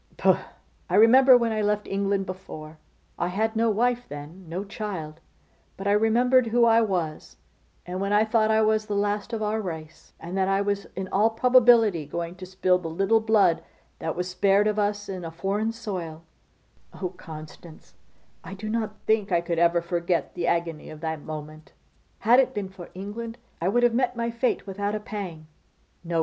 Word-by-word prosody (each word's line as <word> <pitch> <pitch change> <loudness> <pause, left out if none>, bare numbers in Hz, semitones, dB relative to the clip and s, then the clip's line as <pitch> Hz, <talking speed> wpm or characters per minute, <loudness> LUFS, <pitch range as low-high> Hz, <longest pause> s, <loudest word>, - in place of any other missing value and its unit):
'Pooh! - - +4 0.5
I - - +1
remember 255 +4 +7
when 235 -2 0
I 215 -1 -1
left 210 0 0
England 195 0 0
before, 160 -4 -9 0.4
I 175 - 0
had 220 +5 -1
no 230 +1 +2
wife 245 +3 +1
then, 155 +5 -9
no 180 +4 -3
child, 190 -7 -6 0.6
but 195 - -7
I 200 - +2
remembered 235 +4 +3
who 235 +1 +3
I 230 0 +5
was, 170 - -2 0.5
and 180 +1 -4
when 200 +1 -1
I 210 +1 +4
thought 220 -1 +2
I 220 0 +4
was 215 0 +1
the 205 - -2
last 205 +2 -1
of 225 -2 -2
our 215 +1 -1
race, 160 -5 -8
and 175 +3 -7
that 190 -1 +1
I 195 0 +2
was 200 0 -1
in 190 0 -4
all 210 +3 +3
probability 230 - +4
going 170 +2 -4
to 185 0 -9
spill 185 -1 +2
the 175 - -6
little 195 +7 +2
blood 210 -7 +3 0.4
that 160 - -3
was 180 +1 -2
spared 195 +2 +3
of 210 0 +1
us 205 0 -1
in 185 -2 -5
a 165 - -5
foreign 200 +6 -1
soil, 180 -8 -6 0.8
oh, 185 - -2
Constance, 160 -2 -12 0.5
I 190 - -8
do 215 +2 -6
not 220 -1 -2
think 220 -2 +1
I 175 - +4
ever 170 0 +2
could 170 - -18
forget 170 0 -1
the 170 - -2
agony 170 -2 -1
of 155 0 -10
that 160 -2 -3
moment. 155 0 -9 0.5
Had 240 +4 +5
it 265 - +2
been 200 -2 -3
for 190 -2 -11
England, 225 +5 -6 0.2
I 170 - 0
would 240 +5 +2
have 240 -1 +4
met 250 0 +1
my 235 0 -2
fate 235 +2 -1
without 200 +1 -3
a - - -2
pang. 195 -8 -7 0.6
No! 170 -1 -1
200 Hz, 190 wpm, -25 LUFS, 170-220 Hz, 0.8 s, remember